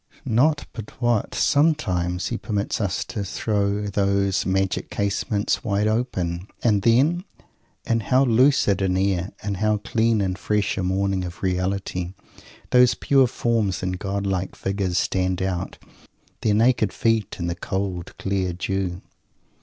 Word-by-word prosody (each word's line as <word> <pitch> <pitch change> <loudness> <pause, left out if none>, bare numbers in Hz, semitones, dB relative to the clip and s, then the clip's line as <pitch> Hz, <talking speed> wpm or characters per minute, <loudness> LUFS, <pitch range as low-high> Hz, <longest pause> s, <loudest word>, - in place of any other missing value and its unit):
Not 140 +5 +2
but 110 -3 -9
what, 120 -3 0
sometimes, 95 - +1
he 120 - -2
permits 105 0 -2
us 100 -2 -1
to 105 -4 -4
throw 100 +1 -1
those 100 -1 +1
"magic 95 0 0
casements" 100 +1 -1
wide 105 -2 0
open. 95 -6 -1 0.2
And 105 -4 +3
then, 140 - +3 0.6
in 115 - +1
how 130 +5 +3
lucid 120 -5 +3
an 95 -1 +1
air, 95 -1 0
in 100 0 -2
how 105 0 +2
clean 110 +1 +1
and 95 -1 -1
fresh 105 -1 0
a - - -2
morning 95 +1 0
of 90 0 -8
reality, 90 -1 -2 0.6
those 125 0 +5
pure 135 -2 +3
forms 115 -6 0
and 90 -1 -2
godlike 95 -2 -2
figures 95 -2 -2
stand 95 0 0
out, 95 -2 -3 0.6
their 105 -2 +2
naked 115 -2 +3
feet 115 -2 0
in 85 - -3
the 85 - -1
cold, 90 0 -4
clear 95 -2 -1
dew! 95 0 -3
100 Hz, 140 wpm, -23 LUFS, 95-115 Hz, 0.6 s, those